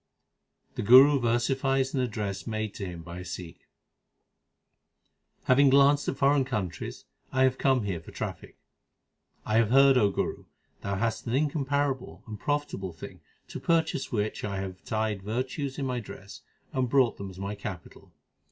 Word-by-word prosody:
The -, -, -4 dB
Guru 135 Hz, +6 st, +8 dB
versifies 130 Hz, +3 st, +1 dB
an 135 Hz, -, 0 dB
address 105 Hz, -6 st, -3 dB
made 110 Hz, -2 st, -3 dB
to 100 Hz, -, -5 dB
him 85 Hz, -2 st, -8 dB
by 85 Hz, +1 st, -8 dB
a -, -, -7 dB
Sikh: 90 Hz, -1 st, -8 dB, 1.8 s
Having 135 Hz, +2 st, +5 dB
glanced 140 Hz, +2 st, +4 dB
at -, -, -2 dB
foreign 140 Hz, 0 st, +3 dB
countries 95 Hz, -9 st, -4 dB, 0.3 s
I 130 Hz, 0 st, +2 dB
have 130 Hz, 0 st, +2 dB
come 130 Hz, -4 st, +2 dB
here 95 Hz, -4 st, -2 dB
for -, -, -13 dB
traffic. -, -, -6 dB, 0.9 s
I 110 Hz, -, +1 dB
have 115 Hz, -2 st, +3 dB
heard, 135 Hz, +1 st, +6 dB
O 105 Hz, -3 st, +4 dB
Guru, -, -, -3 dB, 0.4 s
thou 100 Hz, 0 st, -2 dB
hast 115 Hz, +4 st, -2 dB
an 115 Hz, -, 0 dB
incomparable 140 Hz, -2 st, -1 dB
and 105 Hz, -2 st, -8 dB
profitable 145 Hz, -, -2 dB
thing, 80 Hz, -, -10 dB, 0.3 s
2 -, -, -7 dB
To -, -, -21 dB
purchase 165 Hz, -4 st, +1 dB
which 105 Hz, -3 st, -2 dB
I 100 Hz, -2 st, -3 dB
have 95 Hz, -1 st, -7 dB
tied 110 Hz, -3 st, -2 dB
virtues 130 Hz, +6 st, -3 dB
in 140 Hz, -, -2 dB
my 125 Hz, -2 st, -1 dB
dress 100 Hz, -3 st, -11 dB, 0.3 s
3 -, -, -3 dB
and 125 Hz, -1 st, +1 dB
brought 130 Hz, -2 st, +3 dB
them 100 Hz, -1 st, -6 dB
as 95 Hz, -, -12 dB
my 100 Hz, +2 st, -4 dB
capital. 100 Hz, -4 st, -9 dB
120 Hz, 170 wpm, -28 LUFS, 100-135 Hz, 1.8 s, Guru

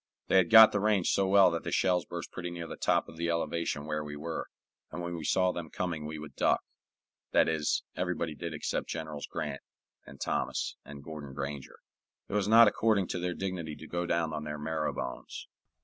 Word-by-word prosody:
They -, -, +5 dB
had 95 Hz, -2 st, +4 dB
got 110 Hz, -1 st, +10 dB
the 100 Hz, -, 0 dB
range 105 Hz, -3 st, +2 dB
so 95 Hz, -, +2 dB
well 95 Hz, -2 st, +6 dB
that 85 Hz, -, -3 dB
the -, -, -4 dB
shells 90 Hz, -3 st, +2 dB
burst -, -, -6 dB
pretty 90 Hz, -1 st, -5 dB
near 85 Hz, -1 st, -6 dB
the -, -, -7 dB
top -, -, +1 dB
of 80 Hz, -, -12 dB
the 85 Hz, 0 st, -1 dB
elevation 85 Hz, -3 st, -1 dB
where 75 Hz, 0 st, -2 dB
we 75 Hz, 0 st, -7 dB
were, 80 Hz, +2 st, -4 dB, 0.4 s
and 80 Hz, -, -6 dB
when 85 Hz, 0 st, -4 dB
we 80 Hz, -, -6 dB
saw 90 Hz, +4 st, +2 dB
them 85 Hz, -3 st, -6 dB
coming 85 Hz, -5 st, -3 dB
we 80 Hz, 0 st, -5 dB
would 75 Hz, -2 st, -9 dB
duck -, -, +2 dB, 0.7 s
that -, -, +5 dB
is, 80 Hz, -2 st, 0 dB
everybody 90 Hz, -3 st, -2 dB
did 85 Hz, +2 st, -5 dB
except 75 Hz, -, -3 dB
Generals 80 Hz, -3 st, -5 dB
Grant 75 Hz, -3 st, -4 dB, 0.5 s
and 70 Hz, -, -12 dB
Thomas -, -, -1 dB
and 70 Hz, 0 st, -10 dB
Gordon 75 Hz, -3 st, -8 dB
Granger. 70 Hz, 0 st, -5 dB, 0.5 s
It -, -, -8 dB
was 105 Hz, -1 st, +1 dB
not 115 Hz, +1 st, +8 dB
according 105 Hz, -2 st, +2 dB
to 90 Hz, -, -2 dB
their 90 Hz, 0 st, -2 dB
dignity 90 Hz, -5 st, -4 dB
to 80 Hz, -, -11 dB
go 85 Hz, 0 st, -2 dB
down 85 Hz, -2 st, 0 dB
on 75 Hz, -1 st, -3 dB
their 75 Hz, 0 st, -4 dB
marrow 75 Hz, +1 st, -2 dB
bones. 65 Hz, -, -6 dB
85 Hz, 210 wpm, -30 LUFS, 75-90 Hz, 0.7 s, got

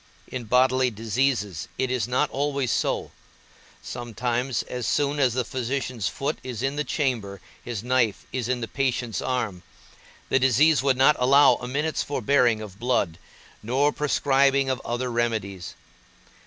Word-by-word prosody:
In 125 Hz, -2 st, -6 dB
bodily 130 Hz, +2 st, +3 dB
diseases 110 Hz, -, -1 dB
it 130 Hz, -1 st, -1 dB
is 120 Hz, -4 st, 0 dB
not 130 Hz, +4 st, +1 dB
always 140 Hz, -2 st, -1 dB
so; -, -, -1 dB, 0.7 s
sometimes, 120 Hz, +1 st, -2 dB
as 125 Hz, -3 st, -5 dB
soon 145 Hz, 0 st, +1 dB
as 125 Hz, -4 st, +2 dB
the 125 Hz, -2 st, 0 dB
physician's 130 Hz, -4 st, -3 dB
foot 140 Hz, +9 st, -3 dB
is 125 Hz, -2 st, -6 dB
in 135 Hz, +1 st, 0 dB
the 150 Hz, -, -1 dB
chamber, 120 Hz, -9 st, -2 dB, 0.2 s
his 115 Hz, -4 st, -5 dB
knife 125 Hz, -4 st, +1 dB
is 125 Hz, -2 st, -3 dB
in 125 Hz, -1 st, -1 dB
the 115 Hz, -, -3 dB
patient's 125 Hz, -3 st, -1 dB
arm; 115 Hz, -8 st, -2 dB, 0.7 s
the 135 Hz, -, +3 dB
disease 135 Hz, +3 st, +4 dB
would 135 Hz, -2 st, +2 dB
not 135 Hz, +3 st, +5 dB
allow 135 Hz, +1 st, +6 dB
a 125 Hz, -, -7 dB
minute's 150 Hz, +5 st, -1 dB
forbearing 125 Hz, -4 st, +2 dB
of 100 Hz, -2 st, -10 dB
blood, 115 Hz, -9 st, 0 dB, 0.4 s
nor 135 Hz, +6 st, +1 dB
prescribing 140 Hz, -2 st, +2 dB
of 130 Hz, -, -3 dB
other 120 Hz, +1 st, -2 dB
remedies. 110 Hz, -6 st, -2 dB
125 Hz, 150 wpm, -25 LUFS, 115-135 Hz, 0.7 s, allow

